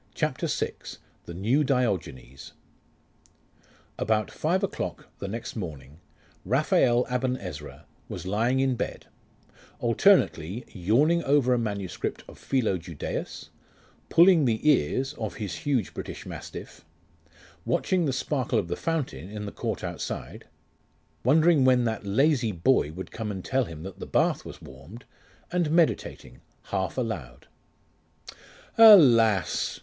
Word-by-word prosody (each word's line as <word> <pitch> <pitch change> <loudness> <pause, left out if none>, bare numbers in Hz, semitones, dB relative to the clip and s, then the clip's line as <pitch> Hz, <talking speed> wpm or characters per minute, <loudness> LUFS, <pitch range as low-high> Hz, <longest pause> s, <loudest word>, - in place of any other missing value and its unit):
CHAPTER - - -1
VI: - - -2 0.5
THE 85 - -8
NEW 115 - +1
DIOGENES 95 - -2 1.5
About 110 0 0
five 180 +5 -1
o'clock 90 - -4
the 100 - -5
next 115 +4 -6
morning, 75 - -7 0.4
Raphael 130 - +2
Aben 125 0 -1
Ezra 75 - -9 0.2
was - - -7
lying 115 +7 +1
in 135 -1 +2
bed, 120 - -5 0.7
alternately 115 - +2
yawning 130 - +2
over 135 -2 +3
a 125 - +1
manuscript 100 -5 -4
of - - -14
Philo 110 -9 0
Judaeus, 85 -2 -6 0.6
pulling 170 -2 +6
the 115 +4 0
ears 135 - +2
of 110 -5 -4
his 105 -4 -5
huge 130 -9 -1
British - - -7
mastiff, - - -9 0.8
watching 180 -3 0
the 140 - 0
sparkle 130 0 -1
of - - -1
the - - -1
fountain 140 - -3
in 105 0 -6
the 100 - -6
court - - -4
outside, - - -6 0.8
wondering 155 +3 +4
when 130 -1 +4
that 110 -3 -3
lazy 130 +2 +2
boy 85 - +2
would 95 +4 -8
come 110 -1 -5
to 100 -2 -4
tell 130 -1 +1
him 80 -4 -9
that 95 0 -9
the - - -7
bath - - +1
was - - -10
warmed, 70 - -12 0.5
and 175 -3 0
meditating, 160 - 0 0.3
half 95 0 -2
aloud.... 90 - -4 1.3
'Alas! 120 - +6
115 Hz, 130 wpm, -26 LUFS, 95-140 Hz, 1.5 s, pulling